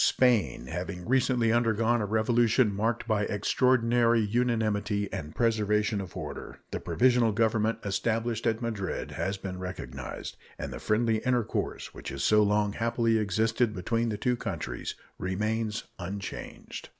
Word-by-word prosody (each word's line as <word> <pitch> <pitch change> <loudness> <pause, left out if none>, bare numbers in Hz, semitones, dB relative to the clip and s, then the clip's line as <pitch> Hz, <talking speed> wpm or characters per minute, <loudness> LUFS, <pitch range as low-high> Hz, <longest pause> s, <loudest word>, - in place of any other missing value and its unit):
Spain 120 - +3
having 90 +5 -5
recently 125 -2 +3
undergone 115 0 +2
a 105 - -1
revolution 110 +1 +3
marked 115 +3 -1
by 110 -2 +2
extraordinary 120 +2 +3
unanimity 105 -2 0
and 80 -6 -5
preservation 105 -2 +1
of 95 -3 -8
order, - - -6
the - - -2
provisional 120 -2 +3
government 110 0 +1
established 115 +3 -1
at 115 +1 0
Madrid 105 -5 -3
has 100 +1 -2
been 95 -1 -6
recognized, 70 -8 -6 0.2
and - - -5
the - - -6
friendly 110 +1 +2
intercourse 125 -2 -1
which - - -7
has 70 0 -4
so 105 0 +5
long 105 0 +2
happily 115 0 +1
existed 110 +3 +1
between 115 +6 0
the 105 - -2
two 125 +4 +1
countries 85 - -4 0.2
remains 105 +4 -1 0.2
unchanged. 95 +2 -6
110 Hz, 140 wpm, -28 LUFS, 100-115 Hz, 0.2 s, so